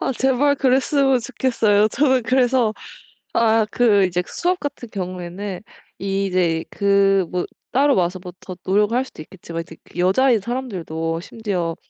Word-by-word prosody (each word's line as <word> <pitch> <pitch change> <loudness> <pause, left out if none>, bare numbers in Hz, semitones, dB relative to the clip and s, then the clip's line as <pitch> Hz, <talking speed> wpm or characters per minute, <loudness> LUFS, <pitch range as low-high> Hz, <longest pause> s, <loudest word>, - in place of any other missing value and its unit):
아 - - -1
제발 265 +3 +2
그랬으면 270 0 +2
좋겠어요. 220 -5 +2
저는 260 +1 +2
그래서 250 -1 +2 0.6
아 225 -1 +3
그 210 -5 +4
이제 180 0 -1
수업 360 +1 -1
같은 265 -5 -6
경우에는 185 0 -5 0.4
이제 185 -4 0
그 200 -1 +3
뭐 180 -1 -1 0.3
따로 280 +1 +3
와서 180 0 0
뭐 180 -1 -8
더 185 - -8
노력을 205 +4 +2
할 255 +1 +1
수도 155 - -12
있겠지만 165 0 -7
이제 165 -1 -12
그 - - -11
여자인 225 +7 +3
사람들도 180 -9 -4
심지어 185 -6 -3
205 Hz, 310 characters per minute, -21 LUFS, 180-255 Hz, 0.6 s, 그